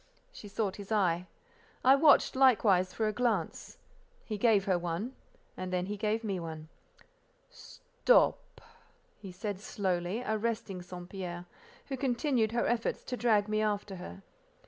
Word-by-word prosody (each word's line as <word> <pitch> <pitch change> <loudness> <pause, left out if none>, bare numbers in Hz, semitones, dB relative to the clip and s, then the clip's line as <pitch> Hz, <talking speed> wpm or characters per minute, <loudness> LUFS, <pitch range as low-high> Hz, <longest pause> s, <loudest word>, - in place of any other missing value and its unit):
She 215 - -11
sought 200 -1 -2
his 200 +1 -10
eye. 180 -4 +1 0.6
I 260 - +8
watched, 290 0 +5
likewise, 210 -9 +4
for 220 +2 -1
a 215 - -1
glance. 220 -8 -2 0.5
He 215 - -4
gave 210 -2 +3
her 185 -3 +2
one, 175 +9 -3 0.4
and 185 0 -5
then 180 0 0
he 205 +2 -4
gave 215 +2 -1
me 195 -4 -2
one. 160 -2 -7 0.8
"Stop!" - - 0 0.6
he 195 -3 -9
said 200 +1 -5
slowly, 190 +1 -2
arresting 220 -3 -2
St. 180 0 -9
Pierre, 180 -2 -6 0.4
who 270 - -3
continued 250 -3 +1
her 235 +1 0
efforts 240 -1 -1
to 250 - -4
drag 220 -4 +2
me 215 0 0
after 205 -2 -2
her. 185 +2 -9
210 Hz, 145 wpm, -31 LUFS, 185-235 Hz, 0.8 s, I